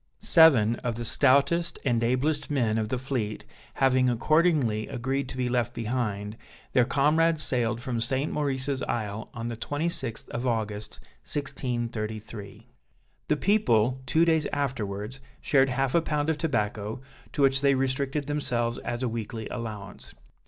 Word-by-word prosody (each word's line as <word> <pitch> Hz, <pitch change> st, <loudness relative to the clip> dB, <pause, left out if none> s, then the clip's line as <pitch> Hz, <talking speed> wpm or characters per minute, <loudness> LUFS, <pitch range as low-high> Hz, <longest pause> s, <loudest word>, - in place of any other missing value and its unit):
Seven 120 Hz, -, +5 dB
of 120 Hz, -2 st, -3 dB
the 120 Hz, +1 st, -4 dB
stoutest 145 Hz, +7 st, +3 dB
and 120 Hz, -3 st, +2 dB
ablest 135 Hz, +6 st, 0 dB
men 115 Hz, -6 st, +1 dB
of 110 Hz, -1 st, -2 dB
the 130 Hz, -, -1 dB
fleet 120 Hz, -5 st, -3 dB, 0.3 s
having 130 Hz, -1 st, +3 dB
accordingly 130 Hz, -4 st, +2 dB
agreed 130 Hz, +2 st, -2 dB
to 130 Hz, -, -6 dB
be 125 Hz, -1 st, 0 dB
left 120 Hz, -1 st, 0 dB
behind, 110 Hz, -3 st, -2 dB, 0.4 s
their 125 Hz, -, +5 dB
comrades 155 Hz, +4 st, +2 dB
sailed 120 Hz, -2 st, 0 dB
from 120 Hz, -2 st, -3 dB
St. 130 Hz, +5 st, 0 dB
Maurice's 135 Hz, -2 st, -1 dB
Isle 110 Hz, -2 st, -3 dB
on 115 Hz, 0 st, -4 dB
the 120 Hz, -, -4 dB
26th 145 Hz, -3 st, -2 dB
of 120 Hz, +2 st, -3 dB
August 105 Hz, -2 st, -3 dB, 0.2 s
1633. 115 Hz, -, -4 dB, 0.6 s
The 150 Hz, -, +2 dB
people, 130 Hz, -, +2 dB
two 160 Hz, +6 st, +4 dB
days 160 Hz, -2 st, +2 dB
afterwards, 115 Hz, -3 st, -3 dB, 0.2 s
shared 135 Hz, -2 st, +3 dB
half 135 Hz, 0 st, 0 dB
a 170 Hz, -, +4 dB
pound 150 Hz, -1 st, 0 dB
of 155 Hz, -, -3 dB
tobacco, 105 Hz, -7 st, -1 dB, 0.3 s
to 145 Hz, -, +1 dB
which 135 Hz, 0 st, +3 dB
they 140 Hz, -1 st, +4 dB
restricted 135 Hz, +2 st, -1 dB
themselves 125 Hz, -5 st, -1 dB
as 120 Hz, +1 st, -4 dB
a -, -, +1 dB
weekly 110 Hz, -1 st, -4 dB
allowance. 110 Hz, -4 st, -7 dB
125 Hz, 145 wpm, -27 LUFS, 115-140 Hz, 0.6 s, Seven